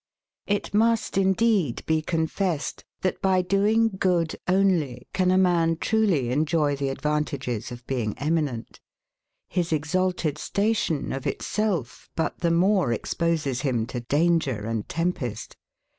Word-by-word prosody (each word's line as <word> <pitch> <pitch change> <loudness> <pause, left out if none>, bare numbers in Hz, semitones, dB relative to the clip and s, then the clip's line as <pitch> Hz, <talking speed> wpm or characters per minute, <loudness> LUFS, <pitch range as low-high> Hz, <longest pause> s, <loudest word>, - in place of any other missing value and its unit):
]. - - -67
It 205 0 -1
must, 225 +2 +2
indeed, 190 - +2
be 160 0 +1
confessed, 160 0 -2 0.2
that 185 - -1
by 185 -1 +3
doing 210 +4 +2
good 170 -3 +1
only, 180 -9 +1
can 185 -1 +2
a 185 - +4
man 170 -3 +3
truly 180 - +1
enjoy 150 +1 +1
the 140 0 -2
advantages 135 -5 -2
of 120 0 -9
being 120 -6 -2
eminent. 145 -6 -2 0.7
His 175 -2 -1
exalted 160 0 0
station, 200 -8 0
of 135 0 -3
itself 195 - -2
but 160 - -2
the 170 - +1
more 180 - +3
exposes 150 +1 -1
him 125 -6 0
to 125 - -2
danger 145 -4 +1
and 115 -2 -3
tempest. 165 -8 -3
165 Hz, 130 wpm, -25 LUFS, 140-185 Hz, 0.7 s, a